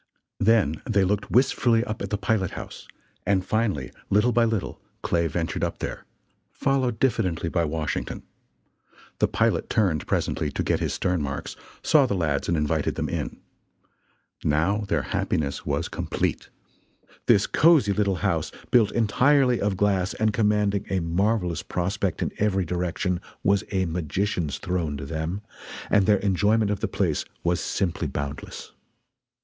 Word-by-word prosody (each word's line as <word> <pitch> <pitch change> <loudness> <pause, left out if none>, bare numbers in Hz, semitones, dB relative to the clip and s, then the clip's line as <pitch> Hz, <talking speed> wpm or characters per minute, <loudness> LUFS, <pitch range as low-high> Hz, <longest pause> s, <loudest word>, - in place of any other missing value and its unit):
Then 100 -8 +3
they 100 -3 +3
looked 100 +2 0
wistfully 120 -2 +3
up 110 -3 -5
at 100 - -3
the 105 - -1
pilot 100 -2 0
house, - - -8 0.4
and 95 -1 +1
finally, 100 - -1 0.2
little 105 +5 +3
by 120 0 +3
little, 110 -4 -2 0.2
Clay 85 -1 +1
ventured 80 +1 -2
up - - -1
there, - - -5 0.5
followed 130 -4 0
diffidently 95 -10 +1
by 85 0 +1
Washington. 75 0 -3 1.0
The - - +4
pilot - - +1
turned 90 -8 +1
presently - - 0
to - - -1
"get - - +1
his - - -1
stern 90 -3 0
marks," 70 -2 -4 0.3
saw 145 -4 +5
the 100 - -1
lads 75 -6 0
and 85 - +1
invited 75 -1 0
them - - -2
in. - - -4 1.0
Now 95 +8 +1
their - - 0
happiness 70 -2 -2
was - - 0
complete. - - -2 0.8
This 100 - +5
cosy 150 -11 +4
little 100 -2 +1
house, - - 0 0.2
built 120 -4 +5
entirely 125 +3 +3
of 100 -2 0
glass 95 -2 +1
and 110 -1 +1
commanding 105 -2 +1
a 95 - +1
marvelous 90 +1 0
prospect 90 0 -2
in - - -2
every 95 -3 +1
direction 90 +1 -1 0.2
was 100 -1 +3
a 95 -2 +1
magician's 85 -1 -2
throne 85 -5 -2
to 70 - -6
them 80 +6 -3 0.5
and 100 -2 +4
their 105 -1 +5
enjoyment 105 +2 +2
of 100 - -1
the - - -1
place - - 0 0.2
was 85 0 +1
simply 90 -3 -1
boundless. 70 +1 -6
95 Hz, 150 wpm, -25 LUFS, 85-105 Hz, 1.0 s, saw